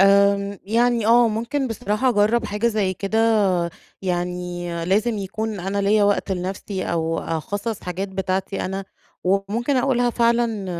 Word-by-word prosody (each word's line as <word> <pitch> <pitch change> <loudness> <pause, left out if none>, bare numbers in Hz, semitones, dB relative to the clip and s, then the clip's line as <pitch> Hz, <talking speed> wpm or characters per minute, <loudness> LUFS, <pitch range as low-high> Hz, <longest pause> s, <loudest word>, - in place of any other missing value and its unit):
امم، 200 0 +4
يعني 230 +1 +2
آه 235 +1 +6
ممكن 235 +5 -2
بصراحة 215 +3 0
أجرَّب 225 0 +3
حاجة 210 +2 -1
زي 210 -5 +1
كده، 200 +4 -2 0.8
يعني 180 -1 -3 0.2
لازم 210 +5 +1
يكون 210 +1 -4
أنا 195 +2 -2
ليَّا 205 +1 +4
وقت 200 -1 +1
لنفسي 190 +1 -4
أو 165 0 -1
أخصَّص 200 +7 -3
حاجات 180 +2 -4
بتاعتي 190 0 -2
أنا، 195 +1 -3 0.4
وممكن 200 +8 +1
أقولها 245 -2 +2
فعلًا 235 -3 +1
200 Hz, 135 wpm, -22 LUFS, 190-230 Hz, 0.8 s, آه